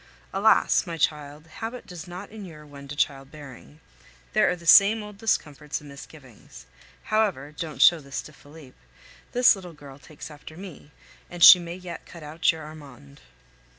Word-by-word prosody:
Alas! -, -, +3 dB
my 165 Hz, -1 st, -5 dB
child, 150 Hz, 0 st, -2 dB
habit 225 Hz, +9 st, -8 dB
does 180 Hz, 0 st, -10 dB
not 180 Hz, +4 st, -9 dB
inure 180 Hz, -8 st, -11 dB
one 140 Hz, -1 st, -13 dB
to 145 Hz, -, -8 dB
child 135 Hz, -2 st, -2 dB
bearing. 145 Hz, 0 st, -14 dB, 0.5 s
There -, -, +3 dB
are 180 Hz, -, -1 dB
the 170 Hz, -1 st, -16 dB
same 210 Hz, +5 st, +6 dB
old 210 Hz, -1 st, -12 dB
discomforts 150 Hz, -9 st, -2 dB
and 150 Hz, -, -15 dB
misgivings. 130 Hz, -, -14 dB, 0.4 s
However 200 Hz, -10 st, -1 dB
(don't 155 Hz, +1 st, -2 dB
show 170 Hz, -, +6 dB
this 140 Hz, -2 st, -7 dB
to 155 Hz, -, -14 dB
Felipe), 145 Hz, -2 st, -17 dB, 0.5 s
this 245 Hz, -2 st, +5 dB
little 180 Hz, -3 st, -11 dB
girl 145 Hz, -2 st, -14 dB
takes 150 Hz, +1 st, -12 dB
after 150 Hz, +2 st, -13 dB
me, 185 Hz, -6 st, -12 dB, 0.4 s
and 175 Hz, -1 st, -3 dB
she 180 Hz, -, +11 dB
may 170 Hz, 0 st, -7 dB
yet 180 Hz, -1 st, -10 dB
cut 170 Hz, -3 st, -12 dB
out 155 Hz, +2 st, 0 dB
your 160 Hz, -1 st, -10 dB
Armand. 140 Hz, -, -14 dB
155 Hz, 170 wpm, -25 LUFS, 145-180 Hz, 0.5 s, she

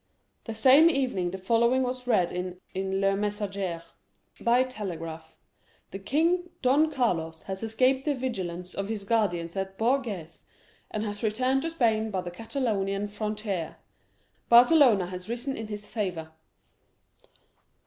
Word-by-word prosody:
The 225 Hz, -, -5 dB
same 270 Hz, +8 st, +7 dB
evening 255 Hz, -, 0 dB
the 190 Hz, -, -5 dB
following 235 Hz, +6 st, +2 dB
was 250 Hz, 0 st, -4 dB
read 185 Hz, -8 st, +2 dB
in 180 Hz, 0 st, -4 dB, 0.4 s
Le 195 Hz, 0 st, +2 dB
Messager: 200 Hz, -4 st, -3 dB, 0.6 s
"[By 240 Hz, +2 st, +3 dB
telegraph.] 165 Hz, -9 st, -7 dB, 0.6 s
The 195 Hz, -, -6 dB
king, 335 Hz, -, +1 dB
Don 285 Hz, +5 st, +4 dB
Carlos, 165 Hz, -, -1 dB
has 190 Hz, 0 st, -5 dB
escaped 255 Hz, +4 st, +1 dB
the 295 Hz, -2 st, +1 dB
vigilance 185 Hz, -9 st, -4 dB
of 195 Hz, 0 st, -3 dB
his 215 Hz, -2 st, -4 dB
guardians 195 Hz, -6 st, 0 dB
at 195 Hz, 0 st, -4 dB
Bourges, 220 Hz, -, -1 dB, 0.5 s
and 215 Hz, -, -3 dB
has 205 Hz, -1 st, -4 dB
returned 255 Hz, +5 st, +1 dB
to 330 Hz, -, -2 dB
Spain 225 Hz, -8 st, +1 dB
by 190 Hz, -3 st, -2 dB
the 175 Hz, -1 st, -6 dB
Catalonian 205 Hz, -2 st, -2 dB
frontier. 210 Hz, -4 st, -4 dB, 0.7 s
Barcelona 240 Hz, -, +6 dB
has 180 Hz, +2 st, -8 dB
risen 245 Hz, +3 st, -3 dB
in 220 Hz, -, -6 dB
his 210 Hz, -1 st, -6 dB
favor." 180 Hz, -7 st, -4 dB
215 Hz, 135 wpm, -27 LUFS, 185-250 Hz, 0.7 s, same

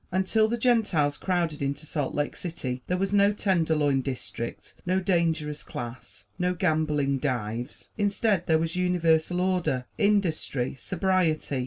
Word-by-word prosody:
Until 190 Hz, +4 st, +2 dB
the 235 Hz, +2 st, -1 dB
Gentiles 210 Hz, -, +2 dB
crowded 170 Hz, -5 st, -1 dB
into 140 Hz, +2 st, -2 dB
Salt 145 Hz, -3 st, -2 dB
Lake 145 Hz, 0 st, -1 dB
City, 130 Hz, -8 st, -4 dB
there 180 Hz, -, 0 dB
was 195 Hz, +2 st, -1 dB
no 200 Hz, 0 st, +5 dB
"tenderloin 160 Hz, -9 st, +1 dB
district," 125 Hz, -3 st, -6 dB
no 185 Hz, +1 st, +1 dB
"dangerous 165 Hz, -5 st, 0 dB
class," 120 Hz, +1 st, -8 dB
no 180 Hz, 0 st, +1 dB
gambling 155 Hz, -5 st, +1 dB
"dives." 120 Hz, -2 st, -3 dB
Instead, 205 Hz, -2 st, +1 dB
there 160 Hz, -, +4 dB
was 165 Hz, +1 st, -2 dB
universal 175 Hz, -1 st, +2 dB
order, 180 Hz, -9 st, 0 dB
industry, 180 Hz, -, +1 dB
sobriety. 165 Hz, -3 st, 0 dB
165 Hz, 135 wpm, -27 LUFS, 145-185 Hz, -, no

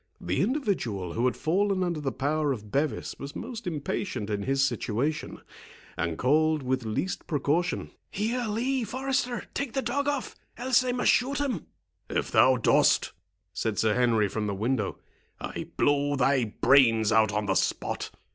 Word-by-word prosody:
The 90 Hz, +2 st, -1 dB
individual 185 Hz, -, -1 dB
who 120 Hz, -, 0 dB
had 125 Hz, -, +1 dB
fallen 190 Hz, +3 st, +1 dB
under 170 Hz, -4 st, -2 dB
the 135 Hz, -2 st, -1 dB
power 145 Hz, +2 st, 0 dB
of 105 Hz, -5 st, -5 dB
Bevis 145 Hz, +4 st, -1 dB
was 140 Hz, +1 st, -7 dB
most 230 Hz, -2 st, -6 dB
impatient 145 Hz, -, -3 dB
in 100 Hz, -1 st, -1 dB
his 135 Hz, +4 st, +2 dB
situation, 135 Hz, +4 st, -2 dB, 0.5 s
and 85 Hz, -1 st, -2 dB
called 155 Hz, +3 st, +2 dB
with 130 Hz, 0 st, -1 dB
least 110 Hz, +12 st, -3 dB
precaution—"Here, 180 Hz, -, -1 dB
Lee,—Forester—take 255 Hz, +2 st, -2 dB
the 270 Hz, -, -1 dB
dog 280 Hz, +4 st, -1 dB
off, 285 Hz, -3 st, -2 dB, 0.2 s
else 255 Hz, +1 st, +3 dB
I 250 Hz, -, 0 dB
must 245 Hz, 0 st, +3 dB
shoot 270 Hz, +3 st, +1 dB
him." 260 Hz, -, -2 dB, 0.4 s
"If -, -, -2 dB
thou 130 Hz, 0 st, +5 dB
dost," 120 Hz, -, +3 dB, 0.4 s
said 110 Hz, -2 st, -2 dB
Sir 110 Hz, -1 st, +2 dB
Henry, 115 Hz, -3 st, +3 dB
from 105 Hz, +2 st, -3 dB
the 100 Hz, -, -2 dB
window, 110 Hz, 0 st, -1 dB, 0.4 s
"I -, -, -5 dB
blow 145 Hz, 0 st, +2 dB
thy 135 Hz, -1 st, +2 dB
brains 115 Hz, -1 st, +4 dB
out 110 Hz, -1 st, +4 dB
on 105 Hz, 0 st, -1 dB
the 95 Hz, -, +1 dB
spot. -, -, -1 dB
145 Hz, 155 wpm, -27 LUFS, -, 0.5 s, thou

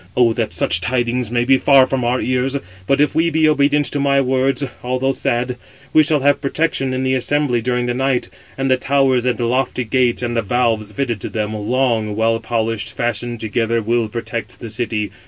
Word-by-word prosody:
O 120 Hz, -2 st, +4 dB
that -, -, -2 dB
such 85 Hz, -, +1 dB
[tidings] 120 Hz, +1 st, -1 dB
may 120 Hz, 0 st, 0 dB
be 135 Hz, +1 st, +4 dB
far 135 Hz, -2 st, +6 dB
from 130 Hz, -1 st, -2 dB
our 125 Hz, +2 st, +1 dB
ears. 130 Hz, +1 st, -1 dB
586 95 Hz, -9 st, -8 dB
But 135 Hz, -, +2 dB
if 150 Hz, -, +2 dB
we 165 Hz, +1 st, +2 dB
be 160 Hz, -1 st, +2 dB
obedient 145 Hz, 0 st, +2 dB
to 145 Hz, -, -2 dB
my 140 Hz, 0 st, +2 dB
words, 135 Hz, +1 st, +1 dB, 0.2 s
although 130 Hz, +2 st, 0 dB
sad, 125 Hz, -1 st, -1 dB, 0.4 s
we 155 Hz, -, +7 dB
shall 150 Hz, -1 st, +2 dB
have 145 Hz, +1 st, +2 dB
protection 140 Hz, -1 st, -1 dB
587 130 Hz, -, -2 dB
in 130 Hz, -, -2 dB
the 130 Hz, 0 st, +1 dB
assembly 130 Hz, -1 st, +1 dB
during 125 Hz, +1 st, -1 dB
the 120 Hz, -, -1 dB
night, 130 Hz, 0 st, 0 dB, 0.3 s
and 135 Hz, 0 st, 0 dB
the 130 Hz, -, +4 dB
towers 130 Hz, -2 st, +1 dB
and 125 Hz, -1 st, 0 dB
lofty 125 Hz, +1 st, 0 dB
gates, 125 Hz, +1 st, +1 dB
and 120 Hz, 0 st, -2 dB
the 115 Hz, -, +2 dB
valves 115 Hz, -1 st, 0 dB
fitted 115 Hz, -2 st, -3 dB
to -, -, -5 dB
them, 105 Hz, -1 st, -3 dB
long, 110 Hz, 0 st, 0 dB
well 115 Hz, +1 st, +1 dB
polished, 115 Hz, -2 st, -2 dB
fastened 120 Hz, 0 st, -2 dB
together, 115 Hz, +1 st, 0 dB
will 115 Hz, +1 st, 0 dB
protect 115 Hz, 0 st, -5 dB
the 115 Hz, -3 st, -7 dB
city. 110 Hz, -3 st, -2 dB
125 Hz, 210 wpm, -18 LUFS, 115-135 Hz, 0.4 s, we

